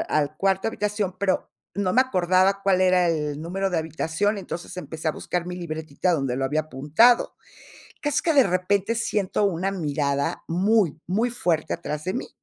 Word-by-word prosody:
al 150 0 -1
cuarto 195 +2 +1
habitación, 210 -3 -2
pero 190 -1 0 0.3
no 190 -2 0
me 255 - +6
acordaba 185 -4 +2
cuál 190 -2 +3
era 185 -1 +4
el 150 -3 -1
número 190 +4 -2
de 175 - 0
habitación, 160 +6 -1
entonces, 180 -3 -7
empecé 160 -3 -4
a - - 0
buscar 175 +2 -3
mi 180 0 -5
libretita 160 0 -2
donde 135 -6 -1
lo 135 - -1
había 150 +4 +1
apuntado. 155 - +3 0.6
Casi 295 -1 0
que 330 - +2
de 275 -4 +6
repente, 195 +3 +1
siento 210 -4 -1
una 195 0 0
mirada 145 -5 -1
muy, 185 -2 +2
muy 220 +7 +1
fuerte 170 -9 0
atrás 150 -3 -5
de 185 - -2
mí. 250 - -4
180 Hz, 175 wpm, -24 LUFS, 155-200 Hz, 0.6 s, me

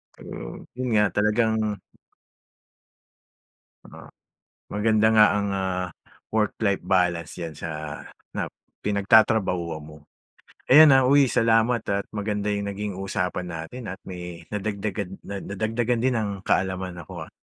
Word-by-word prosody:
Siguro - - -9
yun 125 0 -3
nga 105 - +5
talagang 110 +2 +2 2.3
Oo, - - -13 0.6
maganda 110 +1 +2
nga 105 -1 +8
ang, 100 -1 0
ah, 95 -1 -1 0.5
work-life 105 -2 0
balance 85 -4 +1
yan 85 -2 -5
sa 85 - -5 0.7
nap - - -3 0.3
pinagtatrabahuan 100 -5 +3
mo. 75 0 -12 0.8
Ayan, 150 0 +9
ah, 135 - +5
uy 140 0 +5
salamat 115 0 +3
at 100 0 -1
maganda 105 0 -2
yung 100 0 -1
naging 105 0 -4
usapan 90 -1 -2
natin 80 +10 -7
at 95 - -8
may 90 -2 -7
nadagdagan, 100 -2 -3
na 100 0 -6
nadagdagan 115 +4 -1
din 130 0 +2
ang 110 -2 -1
kaalamanan 95 -2 -1
ko, 85 -4 -8
ah. - - -36
100 Hz, 125 wpm, -25 LUFS, 90-110 Hz, 2.3 s, Ayan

